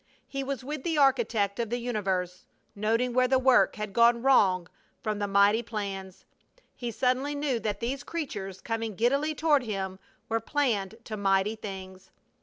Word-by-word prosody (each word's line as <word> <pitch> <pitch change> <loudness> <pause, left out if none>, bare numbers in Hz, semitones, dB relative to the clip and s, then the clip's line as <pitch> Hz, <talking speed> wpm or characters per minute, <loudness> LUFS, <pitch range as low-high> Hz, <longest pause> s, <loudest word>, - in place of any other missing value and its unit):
He 275 0 -4
was 270 -2 -4
with 295 +1 -5
the 325 -2 -1
architect 230 -7 +2
of 230 -2 -1
the 240 - -1
universe, 190 -7 -2 0.3
noting 230 +4 0
where 255 +1 +4
the 260 +1 +3
work 260 -1 +4
had 210 -2 -5
gone 235 +1 +4
wrong 190 -10 +4 0.4
from 215 -1 -2
the 205 - -1
mighty 200 +3 +4
plans. 195 -5 -6 0.5
He 240 - -4
suddenly 255 +5 0
knew 285 -4 0
that 210 -1 -3
these 250 +3 -2
creatures 200 - -5
coming 225 -2 -3
giddily 275 +8 +1
toward 300 -3 +3
him 195 -5 -4 0.3
were 225 0 0
planned 225 -6 -1
to 215 -2 -6
mighty 195 +1 +2
things! 190 -3 -9
225 Hz, 165 wpm, -28 LUFS, 200-260 Hz, 0.5 s, where